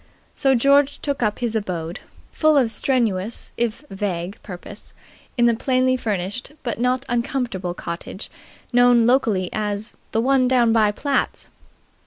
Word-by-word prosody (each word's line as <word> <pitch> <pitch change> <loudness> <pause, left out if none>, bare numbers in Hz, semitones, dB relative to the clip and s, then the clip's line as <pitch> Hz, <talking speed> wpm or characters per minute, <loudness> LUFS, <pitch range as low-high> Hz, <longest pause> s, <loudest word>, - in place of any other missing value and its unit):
So 270 -1 +2
George 280 +3 +4
took 285 -2 -2
up 210 -3 +1
his 235 -2 -2
abode, 175 -4 -3 0.3
full 310 -2 +3
of 245 -5 +3
strenuous 225 -5 -1
if 235 +3 -2
vague 190 0 -3
purpose, 190 +2 -10 0.4
in 240 - +4
the 235 - +5
plainly 255 +2 +2
furnished 215 +2 -3
but 235 -4 -3
not 250 +2 +1
uncomfortable 235 -8 -2
cottage 170 +4 -6 0.4
known 245 -1 +5
locally 225 -7 +2
as 210 0 -2 0.2
"the 225 - +1
one 260 +1 +3
down 240 -3 +3
by 215 -2 +4
Platt's." 275 +6 -2
235 Hz, 140 wpm, -22 LUFS, 205-255 Hz, 0.4 s, the